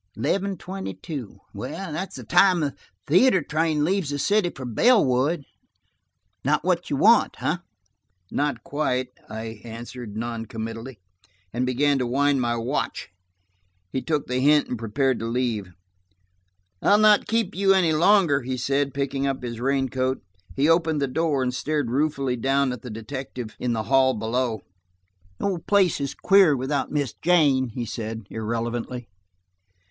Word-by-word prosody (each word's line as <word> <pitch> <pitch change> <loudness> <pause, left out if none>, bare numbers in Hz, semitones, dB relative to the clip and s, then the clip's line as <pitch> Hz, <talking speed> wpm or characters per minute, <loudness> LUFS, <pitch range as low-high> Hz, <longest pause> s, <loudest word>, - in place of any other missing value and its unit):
Eleven 195 - -1
twenty 190 - -6
two. 125 - -7 0.2
That's 190 0 -5
the - - -8
time 185 -3 +4
the 145 -2 -2 0.3
theater 185 - +4
train 155 0 0
leaves 185 -3 0
the 145 - -2
city 200 +4 +2
for 130 -6 -8
Bellwood. 140 - +3 1.0
Not - - +1
what - - 0
you - - 0
want, - - +4
eh?" - - +1 0.7
"Not 145 -5 -1
quite," 130 -4 -1 0.2
I 110 -1 -7
answered 115 -1 -8
non 115 0 -4
committally 115 +3 -6 0.6
and 125 +2 -1
began 140 +2 +2
to 125 - -1
wind 140 +2 +2
my 120 -1 0
watch. 120 +5 -3 0.8
He 130 - -2
took 150 -3 -1
the 125 +1 -1
hint 150 +2 +4
and 125 - -4
prepared 130 +3 0
to 115 - -3
leave. 115 -5 -2 1.1
"I'll 205 - +5
not 215 -1 +5
keep 225 -3 0
you 195 0 +3
up - - +4
any 170 -4 +3
longer," 170 -3 +4
he 130 +1 -3
said, 140 +2 0
picking 140 0 -1
up 135 -2 -2
his 120 -2 -5
raincoat. 130 -1 0 0.3
He 140 +2 +2
opened 165 -2 +3
the 140 - 0
door 145 0 0
and 125 0 -1
stared 145 -1 -1
ruefully 135 -2 0
down 135 +2 +1
at 125 - -8
the 125 - -8
detective 120 +1 -6
in 125 -1 -1
the 110 -1 -1
hall 130 +1 +3
below. 115 0 -1 0.8
"The - - -4
old 180 -4 -3
place 195 -7 +3
is 140 - -3
queer 190 -7 +5
without 135 +2 -2
Miss 145 -5 -1
Jane," 145 -7 +3
he 120 +1 -4
said 110 0 -5
irrelevantly. 115 +2 -3
135 Hz, 155 wpm, -24 LUFS, 120-155 Hz, 1.1 s, I'll